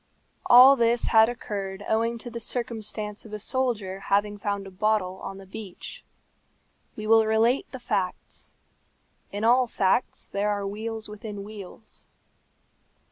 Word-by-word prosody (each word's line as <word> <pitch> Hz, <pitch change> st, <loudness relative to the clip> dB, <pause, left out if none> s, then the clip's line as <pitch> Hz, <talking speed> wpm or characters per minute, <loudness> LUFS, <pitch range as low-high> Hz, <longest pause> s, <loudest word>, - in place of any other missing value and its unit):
All 255 Hz, +3 st, +9 dB
this 235 Hz, -1 st, +2 dB
had 220 Hz, 0 st, +6 dB
occurred 200 Hz, -4 st, -5 dB
owing 230 Hz, +1 st, +1 dB
to 240 Hz, +1 st, -8 dB
the 235 Hz, -, -5 dB
circumstance 215 Hz, -3 st, -4 dB
of 220 Hz, -, -12 dB
a -, -, -2 dB
soldier 210 Hz, -5 st, -2 dB
having 205 Hz, +1 st, +2 dB
found 200 Hz, -1 st, -3 dB
a 195 Hz, -, -10 dB
bottle 190 Hz, -1 st, 0 dB
on 195 Hz, 0 st, -6 dB
the 195 Hz, -, -11 dB
beach. 195 Hz, -1 st, -9 dB, 0.9 s
We 215 Hz, -, -6 dB
will 225 Hz, 0 st, +5 dB
relate 225 Hz, +4 st, +2 dB
the 260 Hz, -, -6 dB
facts. 200 Hz, -7 st, -4 dB, 0.8 s
In 205 Hz, +2 st, -4 dB
all 245 Hz, +2 st, +4 dB
facts 195 Hz, +2 st, 0 dB
there 205 Hz, +1 st, -1 dB
are 205 Hz, -1 st, -1 dB
wheels 220 Hz, +2 st, -5 dB
within 210 Hz, -1 st, -7 dB
wheels. 210 Hz, +1 st, -10 dB
215 Hz, 140 wpm, -26 LUFS, 200-230 Hz, 0.9 s, All